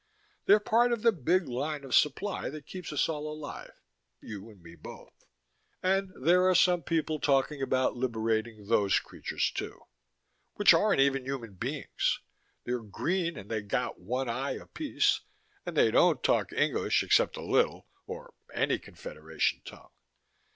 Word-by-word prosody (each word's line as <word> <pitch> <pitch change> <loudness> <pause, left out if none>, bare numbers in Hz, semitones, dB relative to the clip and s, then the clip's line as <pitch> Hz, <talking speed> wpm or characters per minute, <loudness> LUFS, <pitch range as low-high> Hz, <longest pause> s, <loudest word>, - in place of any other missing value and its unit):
They're 205 +2 +7
part 235 +3 +3
of 235 -2 -1
the 230 - +6
big 175 - +1
line 140 +4 -3
of 135 -3 -7
supply 185 +8 +1
that 150 +1 -9
keeps 180 -2 -7
us 150 - +1
all 155 -1 -4
alive, 150 -1 -9 0.4
you 105 0 -9
and 105 -3 -16
me 85 -1 -13
both. 85 - -12 0.7
And 190 +1 +1
there 180 +6 +4
are 185 - +3
some 180 0 +4
people 155 0 -1
talking 140 0 +1
about 130 -1 +1
liberating 110 -3 -2
those 100 -2 +3
creatures, - - -3
too, - - -6 0.7
which 205 - +6
aren't 205 -9 +3
even 135 -1 +2
human 125 -6 -5
beings. 90 - -2 0.4
They're 125 0 -2
green 170 - -2
and 100 - -9
they 110 -1 -1
got 105 - -2
one 125 +8 -2
eye 130 +4 -2
apiece, 310 -3 0 0.5
and - - -4
they - - +5
don't - - +4
talk - - +2
English - - +1
except - - +3
a - - -6
little, - - +1 0.2
or 485 +2 -8 0.2
any - - 0
Confederation - - -3
tongue. - - -12
145 Hz, 155 wpm, -29 LUFS, 120-185 Hz, 0.7 s, They're